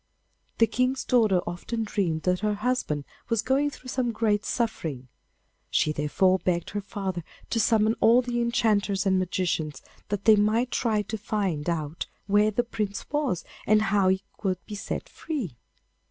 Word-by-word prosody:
The 230 - +6
King's 255 +4 0
daughter 215 -7 +4
often 200 +6 -3
dreamed 175 -7 -1
that 180 0 +1
her 210 0 0
husband 205 - -1 0.2
was 230 -2 +1
going 275 +4 +2
through 255 -2 -11
some 250 -2 0
great 215 -2 +1
suffering; 155 - -2 0.6
she 155 - +2
therefore 185 +6 +2
begged 175 -2 -1
her 205 - -2
father 190 -3 -4 0.3
to 230 - +1
summon 220 0 +3
all 240 +3 +5
the 240 -1 -1
enchanters 210 -4 +1
and 190 -1 +3
magicians, 170 -5 -1 0.3
that 205 -1 -3
they 220 -2 +8
might 220 +4 +2
try 220 -4 +1
to 220 +2 -4
find 195 -7 -1
out 160 -1 -3 0.2
where 205 +1 +4
the 215 +3 0
Prince 210 -4 -4
was 290 - 0 0.2
and 215 +1 +6
how 200 -2 +4
he 190 +1 +2 0.2
could 190 -3 0
be - - -8
set 205 - -4
free. 250 - -5
205 Hz, 165 wpm, -26 LUFS, 185-230 Hz, 0.6 s, they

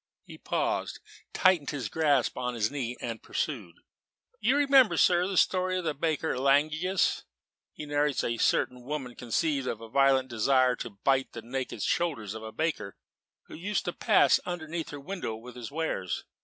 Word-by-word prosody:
He - - -12
paused, - - -2 0.3
tightened 180 -6 +3
his 130 -6 -3
grasp 145 -2 +1
on 125 -1 -3
his 110 -1 0
knee, 125 -4 -4
and 115 -2 -5
pursued. 105 - -4 0.6
"You 250 +7 +2
remember, 275 -4 +5
sir, 180 0 +4
the 195 -2 -3
story 185 0 +2
of 180 - -3
the 160 - -1
baker 160 +1 -1
in - - -3
Langius? 155 +7 +2 0.5
He 150 - -8
narrates 145 -1 +1
that - - -1
a 115 - -2
certain 125 +2 +1
woman 130 -1 -5
conceived 135 +4 -1
a - - -1
violent 130 +4 +2
desire 130 +2 +2
to - - -5
bite 130 +6 0
the 115 - -7
naked 130 +2 -4
shoulders 135 - -1
of 110 - -7
a 110 0 -7
baker 110 -6 -2 0.5
who - - -15
used 200 +5 -2
to - - -2
pass - - +4
underneath 170 -2 -4
her 145 - -7
window 150 - -5
with 120 +2 -11
his 120 -2 -7
wares. 145 - -3
140 Hz, 175 wpm, -28 LUFS, 120-165 Hz, 0.6 s, remember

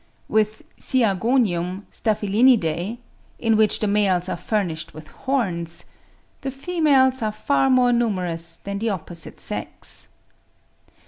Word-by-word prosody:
With 215 0 +1 0.2
Siagonium 200 -5 +1
(Staphylinidae), 210 -3 +2 0.4
in 225 -2 +2
which 215 -1 +3
the - - +2
males 195 -3 +2
are - - -1
furnished 170 -5 -2
with 155 0 -11
horns, 180 -11 -2 0.6
"the 270 - -3
females 270 -3 +2
are 215 -1 0
far 270 +5 +1
more 250 -1 +4
numerous 180 -8 -1
than 200 0 -4
the 225 +2 0
opposite 175 -4 -5
sex." - - -5
215 Hz, 115 wpm, -23 LUFS, 180-245 Hz, 0.6 s, more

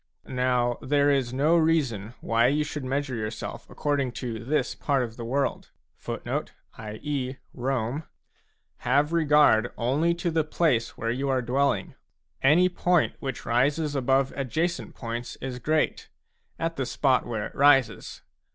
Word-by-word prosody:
Now 125 -1 0
there 145 +1 +3
is 135 -4 +1
no 145 +6 +3
reason 135 - +1
why 115 +1 +3
you 150 +3 +2
should 150 -1 -5
measure 135 +1 -2
yourself 110 -1 -5
according 140 -4 -1
to 115 -4 -5
this 150 +6 0
part 140 -3 0
of 115 -2 -6
the 120 - -7
world 135 +4 -1 0.4
a; 130 +5 -5 1.4
have 145 +6 +1
regard 150 -8 +4
only 145 +8 +1
to 170 0 -2
the 160 -1 +2
place 150 -7 0
where 115 0 -1
you 135 +3 -2
are 130 -1 +1
dwelling. 140 +6 0 0.5
Any 160 +7 +5
point 180 -1 +1
which 135 -4 -5
rises 140 +6 +1
above 135 0 +1
adjacent 155 +6 -2
points 120 0 -5
is 125 -1 -6
great, 155 +4 0 0.5
at 165 0 -2
the 130 - -1
spot 130 -4 +1
where 110 -3 -3
it - - -8
rises. 135 -5 +3
135 Hz, 140 wpm, -26 LUFS, 120-150 Hz, 1.4 s, Any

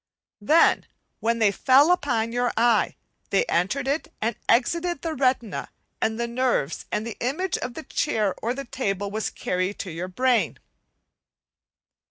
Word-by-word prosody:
Then, 310 +11 +4 0.3
when 230 +1 +1
they 215 -3 +4
fell 270 - +5
upon 235 -10 +1
your 245 +1 0
eye, 230 -2 +3 0.3
they 195 - +2
entered 250 +11 0
it 315 +3 -1
and 225 +1 -1
excited 340 +7 +2
the 325 -1 -2
retina 255 -6 0 0.3
and 220 +1 0
the 235 - 0
nerves, 235 - -1
and 210 - -1
the 230 - -6
image 315 +10 -1
of 250 - -5
the 320 - -6
chair 215 -13 0
or 235 +3 -1
the 275 0 -5
table 200 -5 -2
was 215 +1 -2
carried 185 +2 -2
to 185 - -5
your 170 +3 -4
brain. 245 +6 +1
235 Hz, 155 wpm, -25 LUFS, 210-270 Hz, 0.3 s, fell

